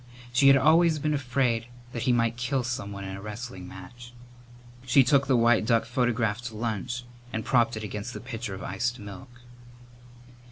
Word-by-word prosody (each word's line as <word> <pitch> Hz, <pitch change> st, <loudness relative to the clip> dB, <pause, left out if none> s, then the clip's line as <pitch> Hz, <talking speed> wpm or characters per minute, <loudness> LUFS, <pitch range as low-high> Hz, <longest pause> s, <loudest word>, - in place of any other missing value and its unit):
She 135 Hz, +3 st, +5 dB
had 135 Hz, 0 st, +8 dB
always 160 Hz, +3 st, +4 dB
been 150 Hz, +1 st, 0 dB
afraid 125 Hz, -4 st, 0 dB, 0.2 s
that 120 Hz, -, -4 dB
he 125 Hz, -, +2 dB
might 115 Hz, -1 st, +2 dB
kill 125 Hz, +2 st, -1 dB
someone 100 Hz, -5 st, -4 dB
in 95 Hz, 0 st, -5 dB
a 95 Hz, -, -8 dB
wrestling 105 Hz, -3 st, -7 dB
match. 120 Hz, +7 st, -11 dB, 0.7 s
She 130 Hz, +2 st, +5 dB
took 140 Hz, +1 st, +3 dB
the 130 Hz, -2 st, +4 dB
white 115 Hz, -1 st, +4 dB
duck 115 Hz, 0 st, +2 dB
photograph 120 Hz, -3 st, 0 dB
to 115 Hz, -2 st, -6 dB
lunch 115 Hz, +2 st, -3 dB, 0.3 s
and 110 Hz, -1 st, -3 dB
propped 120 Hz, -3 st, +2 dB
it 110 Hz, -, -6 dB
against 105 Hz, +3 st, -5 dB
the -, -, -5 dB
pitcher 120 Hz, -4 st, -6 dB
of 95 Hz, -, -8 dB
iced 120 Hz, +1 st, -2 dB
milk. 105 Hz, +4 st, -10 dB
120 Hz, 175 wpm, -27 LUFS, 110-125 Hz, 0.7 s, had